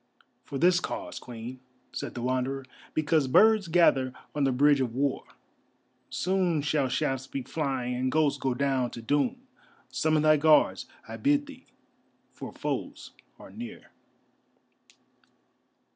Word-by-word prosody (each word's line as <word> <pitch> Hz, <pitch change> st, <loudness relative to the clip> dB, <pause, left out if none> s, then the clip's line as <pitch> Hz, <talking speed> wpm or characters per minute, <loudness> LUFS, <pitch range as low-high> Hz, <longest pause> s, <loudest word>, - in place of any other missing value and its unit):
"For 140 Hz, -, -6 dB
this 180 Hz, +5 st, +4 dB
cause, 310 Hz, -, -5 dB
Queen," 120 Hz, +1 st, -8 dB, 0.3 s
said -, -, -5 dB
the 120 Hz, -, -4 dB
Wanderer; 130 Hz, +1 st, -1 dB, 0.3 s
"because 155 Hz, -2 st, +2 dB
birds 215 Hz, +7 st, +5 dB
gather 140 Hz, -7 st, +3 dB, 0.2 s
on 145 Hz, -2 st, +1 dB
the 135 Hz, -, +2 dB
Bridge 140 Hz, +2 st, +4 dB
of 120 Hz, -3 st, -2 dB
War. 140 Hz, 0 st, 0 dB, 0.9 s
Soon 180 Hz, -4 st, 0 dB
shall 150 Hz, -3 st, +1 dB
shafts 130 Hz, +1 st, -1 dB
be 135 Hz, -1 st, -5 dB
flying 130 Hz, -3 st, -2 dB
and 130 Hz, +1 st, -1 dB
ghosts 145 Hz, -2 st, +2 dB
go 130 Hz, -2 st, -1 dB
down 135 Hz, -2 st, 0 dB
to 115 Hz, -, -8 dB
doom. 235 Hz, -, 0 dB, 0.5 s
Summon 155 Hz, -1 st, +1 dB
thy 155 Hz, 0 st, +5 dB
Guards, 155 Hz, +1 st, +4 dB, 0.2 s
I -, -, -7 dB
bid 290 Hz, +1 st, +2 dB
thee, 270 Hz, -2 st, -13 dB, 0.6 s
for -, -, -8 dB
foes -, -, -5 dB, 0.3 s
are -, -, -13 dB
near." 230 Hz, 0 st, -9 dB
145 Hz, 135 wpm, -28 LUFS, 130-170 Hz, 0.9 s, birds